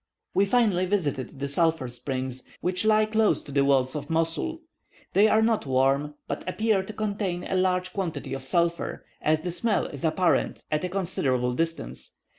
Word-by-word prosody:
We 200 Hz, -, +4 dB
finally 200 Hz, -5 st, +2 dB
visited 145 Hz, -, -1 dB
the 140 Hz, -, -2 dB
sulphur 160 Hz, -1 st, +1 dB
springs, 130 Hz, +1 st, -4 dB, 0.2 s
which 185 Hz, +3 st, -1 dB
lie 215 Hz, 0 st, +5 dB
close 220 Hz, 0 st, +2 dB
to 145 Hz, -, -10 dB
the 140 Hz, 0 st, +3 dB
walls 135 Hz, -1 st, +2 dB
of 150 Hz, -, -5 dB
Mosul. 165 Hz, -, -1 dB, 0.5 s
They 205 Hz, +2 st, +6 dB
are 220 Hz, +1 st, +4 dB
not 225 Hz, -8 st, +1 dB
warm, 135 Hz, +3 st, +2 dB
but -, -, -4 dB
appear 215 Hz, 0 st, +1 dB
to 190 Hz, -, -7 dB
contain 200 Hz, -4 st, -2 dB
a -, -, -3 dB
large 185 Hz, 0 st, +1 dB
quantity 165 Hz, -9 st, -3 dB
of 135 Hz, -, -4 dB
sulphur, 170 Hz, +4 st, 0 dB, 0.2 s
as 155 Hz, 0 st, +2 dB
the 175 Hz, -, -3 dB
smell 215 Hz, +5 st, +1 dB
is 140 Hz, -3 st, -7 dB
apparent 165 Hz, +2 st, +1 dB
at 150 Hz, +2 st, 0 dB
a 180 Hz, -, -1 dB
considerable 135 Hz, -10 st, 0 dB
distance. 165 Hz, -, -3 dB
170 Hz, 175 wpm, -26 LUFS, 140-195 Hz, 0.5 s, They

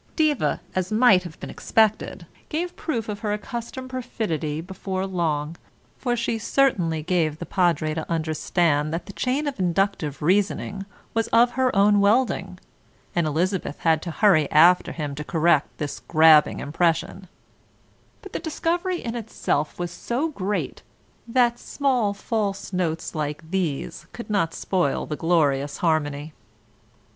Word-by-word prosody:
Diva, 310 Hz, -4 st, +1 dB
as 185 Hz, +1 st, -2 dB
might 215 Hz, -4 st, +5 dB
have 175 Hz, -3 st, -10 dB
been -, -, -7 dB
expected, 220 Hz, -1 st, +1 dB, 0.2 s
gave 345 Hz, +3 st, -3 dB
proof 240 Hz, -9 st, -3 dB
of 205 Hz, -1 st, -4 dB
her 210 Hz, -1 st, -1 dB
accustomed 240 Hz, +4 st, -6 dB
perfidy 175 Hz, -, -3 dB
before 190 Hz, +2 st, -4 dB
long, 165 Hz, -4 st, -2 dB, 0.4 s
for 245 Hz, -2 st, -1 dB
she 230 Hz, -1 st, -1 dB
certainly 180 Hz, -, +1 dB
gave 160 Hz, -3 st, 0 dB
the 170 Hz, -, -6 dB
Padre 170 Hz, -5 st, +1 dB
to 160 Hz, +1 st, -5 dB
understand 155 Hz, -1 st, +1 dB
that 165 Hz, +1 st, -3 dB
the 200 Hz, -, -10 dB
chain 260 Hz, +8 st, -1 dB
of 285 Hz, -7 st, -4 dB
inductive 180 Hz, -5 st, 0 dB
reasoning 195 Hz, +2 st, 0 dB, 0.3 s
was 225 Hz, 0 st, 0 dB
of 235 Hz, +1 st, +4 dB
her 260 Hz, -2 st, +1 dB
own 205 Hz, +1 st, +5 dB
welding 205 Hz, -3 st, +1 dB, 0.6 s
and 170 Hz, -2 st, +2 dB
Elizabeth 175 Hz, +1 st, -1 dB
had 160 Hz, -2 st, +3 dB
to 175 Hz, -, -5 dB
hurry 165 Hz, -5 st, +3 dB
after 175 Hz, +4 st, +5 dB
him 150 Hz, -3 st, -4 dB
to 150 Hz, +2 st, -5 dB
correct 160 Hz, -2 st, +2 dB
this 145 Hz, -2 st, -4 dB
grabbing 155 Hz, -2 st, +5 dB
impression; 165 Hz, +4 st, -1 dB, 1.0 s
but 390 Hz, -, -11 dB
the -, -, -2 dB
discovery 345 Hz, +2 st, -2 dB
in 230 Hz, -, -3 dB
itself 215 Hz, -10 st, -2 dB
was 175 Hz, -1 st, -3 dB
so 255 Hz, -, -2 dB
great, 205 Hz, -7 st, -3 dB, 0.5 s
that 240 Hz, 0 st, +2 dB
small 255 Hz, -7 st, 0 dB
false 200 Hz, -2 st, -3 dB
notes 165 Hz, -3 st, -2 dB
like 155 Hz, +1 st, -4 dB
these 175 Hz, -8 st, -2 dB
could 235 Hz, -2 st, -7 dB
not 165 Hz, -6 st, +1 dB
spoil 180 Hz, -7 st, 0 dB
the 150 Hz, -, -4 dB
glorious 145 Hz, -4 st, +1 dB
harmony. 155 Hz, -2 st, -1 dB
185 Hz, 145 wpm, -24 LUFS, 160-225 Hz, 1.0 s, might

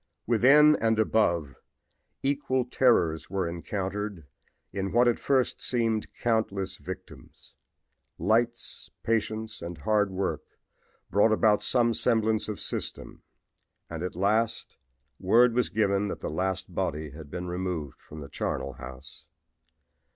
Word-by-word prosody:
"Within 140 Hz, +7 st, +6 dB
and 110 Hz, -1 st, +1 dB
above 85 Hz, -10 st, +1 dB, 0.7 s
equal 135 Hz, -2 st, 0 dB
terrors 105 Hz, -11 st, +2 dB
were 95 Hz, -3 st, -1 dB
encountered 95 Hz, +1 st, -4 dB, 0.5 s
in 95 Hz, 0 st, -2 dB
what 120 Hz, +1 st, +4 dB
at 120 Hz, -, +2 dB
first 130 Hz, -3 st, +1 dB
seemed 115 Hz, -3 st, 0 dB
countless 105 Hz, -5 st, -1 dB
victims. -, -, -10 dB, 0.6 s
Lights, 115 Hz, +6 st, 0 dB
patience 110 Hz, 0 st, -1 dB
and 85 Hz, 0 st, -6 dB
hard 105 Hz, +7 st, +1 dB
work 95 Hz, 0 st, -2 dB, 0.7 s
brought 105 Hz, +3 st, +4 dB
about 110 Hz, -1 st, +3 dB
some 120 Hz, -2 st, +2 dB
semblance 110 Hz, -2 st, +1 dB
of 105 Hz, -, -4 dB
system -, -, -4 dB, 0.7 s
and 80 Hz, -1 st, -5 dB
at 90 Hz, -1 st, -4 dB
last 110 Hz, +5 st, 0 dB, 0.4 s
word 120 Hz, +1 st, +5 dB
was 125 Hz, +1 st, +1 dB
given 105 Hz, -2 st, +1 dB
that -, -, -5 dB
the -, -, -3 dB
last 95 Hz, +2 st, -2 dB
body 80 Hz, -5 st, -2 dB
had 75 Hz, +1 st, -11 dB
been 90 Hz, +3 st, -5 dB
removed 90 Hz, -5 st, -4 dB
from 75 Hz, 0 st, -11 dB
the 70 Hz, -, -8 dB
charnel 70 Hz, -, -3 dB
house. 65 Hz, +2 st, -11 dB
105 Hz, 125 wpm, -28 LUFS, 90-115 Hz, 0.7 s, Within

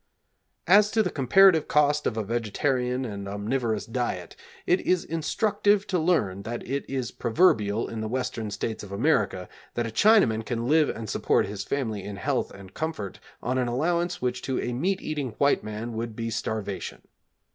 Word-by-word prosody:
As 205 Hz, +4 st, +6 dB
to 220 Hz, -, +4 dB
the 180 Hz, -, -2 dB
comparative 160 Hz, +4 st, +5 dB
cost 150 Hz, 0 st, +3 dB
of 115 Hz, -, -2 dB
a 110 Hz, -, 0 dB
vegetarian 125 Hz, +4 st, -1 dB
and 100 Hz, -3 st, -6 dB
omnivorous 110 Hz, +2 st, -1 dB
diet, 115 Hz, -8 st, -3 dB, 0.3 s
it 180 Hz, -, +3 dB
is 180 Hz, -1 st, +1 dB
instructive 205 Hz, +5 st, +1 dB
to 185 Hz, -2 st, 0 dB
learn 130 Hz, -, +1 dB
that 115 Hz, +3 st, -6 dB
it 140 Hz, +3 st, -3 dB
is 130 Hz, -4 st, -2 dB
proverbial 115 Hz, -, +2 dB
in 115 Hz, -1 st, -5 dB
the 110 Hz, -, -2 dB
Western 115 Hz, -2 st, -3 dB
States 110 Hz, +2 st, -4 dB
of 100 Hz, -, -10 dB
America 100 Hz, -, +1 dB, 0.3 s
that 120 Hz, -, 0 dB
a 115 Hz, -, -4 dB
Chinaman 120 Hz, -, +4 dB
can 115 Hz, +1 st, -3 dB
live 155 Hz, +1 st, +4 dB
and 115 Hz, -1 st, -5 dB
support -, -, +1 dB
his 100 Hz, 0 st, -5 dB
family 110 Hz, -8 st, -2 dB
in 100 Hz, 0 st, -6 dB
health 100 Hz, -, -1 dB
and 95 Hz, -1 st, -13 dB
comfort 155 Hz, -, -4 dB, 0.2 s
on 130 Hz, +2 st, 0 dB
an 125 Hz, -, 0 dB
allowance 170 Hz, +7 st, 0 dB
which 125 Hz, 0 st, -1 dB
to 130 Hz, -, -2 dB
a 120 Hz, -, -2 dB
meat 185 Hz, +10 st, -1 dB
eating 140 Hz, -7 st, -3 dB
white 140 Hz, 0 st, +3 dB
man 110 Hz, +2 st, -5 dB
would 115 Hz, 0 st, -4 dB
be 115 Hz, 0 st, -3 dB
starvation. 110 Hz, -3 st, -4 dB
120 Hz, 180 wpm, -26 LUFS, 110-155 Hz, 0.3 s, As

